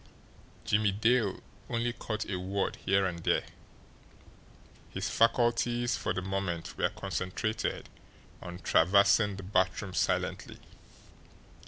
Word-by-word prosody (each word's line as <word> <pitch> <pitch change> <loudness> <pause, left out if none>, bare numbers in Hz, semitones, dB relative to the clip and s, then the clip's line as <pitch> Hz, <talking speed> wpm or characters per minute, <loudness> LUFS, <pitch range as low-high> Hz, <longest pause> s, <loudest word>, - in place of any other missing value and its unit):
Jimmie 105 -2 +2
Dale 110 -1 +2 0.3
only 120 0 -1
caught 110 -2 -4
a 95 -3 -2
word 95 +2 -2
here 95 0 +2
and 85 -2 -3
there - - +1 1.5
his 95 +1 -3
faculties 120 +1 +2
for - - -2
the 95 - -2
moment 95 -3 -3
were - - +1
concentrated 100 +4 -3 0.5
on 90 0 -7
traversing 100 +4 +4
the 95 - -8
bathroom 95 0 0
silently. - - -1
100 Hz, 110 wpm, -30 LUFS, 95-110 Hz, 1.5 s, traversing